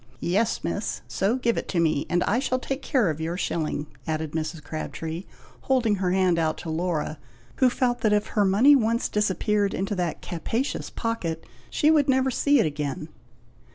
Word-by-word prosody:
'" - - -30
"Yes, 200 +6 0
Miss! - - -2
so 200 +5 0
give 235 -3 +1
it - - -7
to 175 - 0
me, 155 -4 +1
and 175 0 +2
I 230 - +1
shall 255 -1 0
take 270 +1 -4
care 245 - +2
of 155 +1 -6
your 165 +2 -2
shilling!" 155 -5 -2 0.2
added 155 -1 -2
Mrs. 160 0 -4
Crabtree, 160 +3 -5 0.4
holding 240 -6 +2
out - - -7
her 180 -1 +1
hand 185 -3 +3 0.2
to 170 - -7
Laura, 160 -2 -2 0.4
who 255 - +5
fell 245 0 +1
that 215 - +3
if 210 0 +2
her 210 - +2
money 215 +10 +6
once 230 -2 +1
disappeared 210 0 +1
into 195 +3 -2
that 175 -5 -2
capacious 225 - -2
pocket, 185 -9 -3 0.2
she 305 - +3
would 295 -3 +3
never 265 0 +3
see 285 +3 +3
it - - +4
again. 150 0 -3
195 Hz, 190 wpm, -25 LUFS, 165-240 Hz, 0.4 s, money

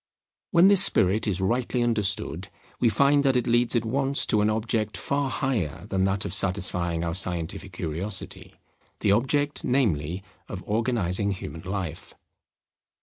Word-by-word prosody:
When 175 +1 +5
this 195 -1 +7
spirit 110 - +2
is 95 -2 -1
rightly 120 +4 0
understood, 95 -6 -1 0.3
we 120 - +3
find 140 +6 +3
that 135 -2 +2
it 125 - +1
leads 120 +1 +1
at 115 -1 +1
once 135 +4 +2
to 105 - +1
an 105 - +2
object 110 0 -2
far 140 -1 -1
higher 115 - -2
than 95 0 0
that 95 0 -1
of - - -4
satisfying 90 -3 +1
our 85 -1 -2
scientific 90 +1 -2
curiosity; 90 +4 -4 0.5
the - - +2
object, 145 +7 0
namely, 95 - 0 0.3
of 95 -1 -7
organizing 105 -4 -1
human 80 -5 -6
life. 90 -3 -6
105 Hz, 145 wpm, -25 LUFS, 90-125 Hz, 0.5 s, this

